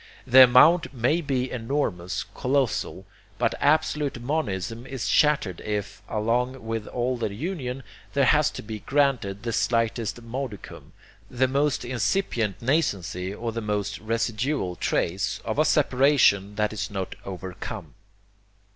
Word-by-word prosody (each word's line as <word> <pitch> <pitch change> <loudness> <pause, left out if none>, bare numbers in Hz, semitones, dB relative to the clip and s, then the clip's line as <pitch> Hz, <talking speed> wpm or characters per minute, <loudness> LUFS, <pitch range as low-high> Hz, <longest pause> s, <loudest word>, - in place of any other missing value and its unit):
The 130 +1 +9
amount 140 +5 +5
may 130 +8 +1
be 130 -4 -1
enormous, 115 -8 -2
colossal; 130 -3 -1 0.3
but - - +1
absolute 145 -2 +1
monism 120 - -3
is 135 -3 -4
shattered 140 - +2
if, 105 -1 -4
along 120 +3 -1
with 115 -1 -3
all 125 +1 -1
the 115 -3 -2
union, 135 - -4 0.3
there 140 -1 +3
has 150 +3 +4
to - - -6
be 110 0 -6
granted 125 -8 0
the 115 -1 -2
slightest 115 -1 0
modicum, 115 -3 -7 0.4
the 130 +1 +1
most 140 0 0
incipient 120 - -1
nascency, 100 - 0
or 115 +3 -4
the 115 +1 -4
most 105 -1 -2
residual 115 -1 -1
trace, 90 +2 -1
of - - -2
a - - +4
separation 125 -7 +3
that 105 +1 0
is 105 -1 -3
not 95 -2 -4
'overcome.' 95 -1 -7
120 Hz, 130 wpm, -25 LUFS, 105-135 Hz, 0.4 s, The